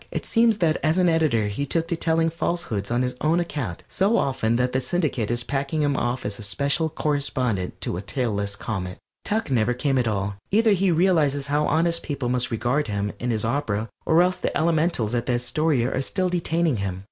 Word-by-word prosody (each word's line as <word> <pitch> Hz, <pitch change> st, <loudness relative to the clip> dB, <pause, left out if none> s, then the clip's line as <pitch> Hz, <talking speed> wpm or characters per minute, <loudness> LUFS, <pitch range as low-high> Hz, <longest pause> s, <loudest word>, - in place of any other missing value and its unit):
It -, -, -4 dB
seems 230 Hz, -2 st, +3 dB
that 165 Hz, -5 st, +2 dB
as 155 Hz, +3 st, +2 dB
an 180 Hz, -1 st, +4 dB
editor 155 Hz, -10 st, +2 dB
he 125 Hz, +8 st, -3 dB
took 165 Hz, +3 st, 0 dB
to 170 Hz, -, +1 dB
telling 165 Hz, 0 st, +1 dB
falsehoods 165 Hz, -, -2 dB
on 120 Hz, +1 st, +1 dB
his 125 Hz, 0 st, -2 dB
own 160 Hz, +3 st, +2 dB
account 145 Hz, -, -4 dB
so 205 Hz, +5 st, +1 dB
often 120 Hz, -4 st, +1 dB
that 125 Hz, +1 st, +1 dB
the 130 Hz, -, 0 dB
Syndicate 130 Hz, -, -1 dB
is 120 Hz, +1 st, 0 dB
packing 140 Hz, +3 st, -1 dB
him 145 Hz, -1 st, +1 dB
off 120 Hz, +1 st, -1 dB
as 105 Hz, +1 st, -4 dB
Special 140 Hz, +9 st, 0 dB
Correspondent 130 Hz, -, -1 dB
to 85 Hz, -, -2 dB
a -, -, -4 dB
tailless 100 Hz, -3 st, -2 dB
comet. 95 Hz, -3 st, -4 dB, 0.3 s
Tuck 215 Hz, -8 st, -1 dB
never 120 Hz, -1 st, +2 dB
came 135 Hz, +1 st, +1 dB
at 120 Hz, -, +1 dB
all; 100 Hz, -2 st, -2 dB
either 220 Hz, +2 st, +4 dB
he 195 Hz, -1 st, +3 dB
realizes 160 Hz, -5 st, +2 dB
how 150 Hz, +1 st, +2 dB
honest 170 Hz, +2 st, +1 dB
people 140 Hz, -5 st, -3 dB
must 125 Hz, -1 st, +1 dB
regard 125 Hz, +6 st, 0 dB
him 100 Hz, -1 st, -2 dB
and 125 Hz, 0 st, -1 dB
his 110 Hz, -1 st, -1 dB
opera, 115 Hz, -4 st, -1 dB
or 165 Hz, +2 st, +4 dB
else 180 Hz, 0 st, +1 dB
the -, -, -2 dB
elementals 160 Hz, -8 st, +1 dB
at 120 Hz, 0 st, -1 dB
the 125 Hz, -, +1 dB
Astoria 125 Hz, +1 st, +1 dB
are -, -, 0 dB
still 185 Hz, +6 st, -1 dB
detaining 165 Hz, -5 st, 0 dB
him. 95 Hz, -2 st, -3 dB
135 Hz, 205 wpm, -24 LUFS, 115-165 Hz, 0.3 s, an